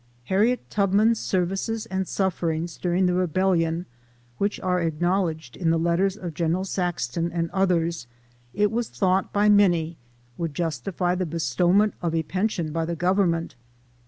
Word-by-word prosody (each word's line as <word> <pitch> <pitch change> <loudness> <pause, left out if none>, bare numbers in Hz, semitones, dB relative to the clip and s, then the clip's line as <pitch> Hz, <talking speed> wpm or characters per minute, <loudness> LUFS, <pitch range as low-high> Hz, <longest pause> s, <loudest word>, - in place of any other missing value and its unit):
Harriet 210 - +1
Tubman's 210 +3 +3
services 195 +5 -1
and 190 -3 -3
sufferings 170 -3 -1
during 180 +1 +1
the 180 - +2
rebellion, 180 -1 +1 0.5
which 200 +1 0
are 180 -1 0
acknowledged 165 -3 -1
in 170 -3 0
the 165 - +3
letters 175 +4 +1
of 175 -5 -6
Gen. 170 +3 0
Saxton, 170 -4 -2
and 165 -1 -2
others, 170 -7 0 0.4
it 205 +5 +1
was 235 0 -1
thought 190 -1 +1
by 205 +1 +2
many, 175 -6 +3 0.4
would 165 -4 -3
justify 170 +3 -1
the 180 -1 -1
bestowment 175 +5 +2
of 165 -2 -1
a 160 - +1
pension 185 -2 -2
by 165 +1 -1
the 170 +1 -2
Government. 175 -2 +1
180 Hz, 145 wpm, -24 LUFS, 165-195 Hz, 0.5 s, Tubman's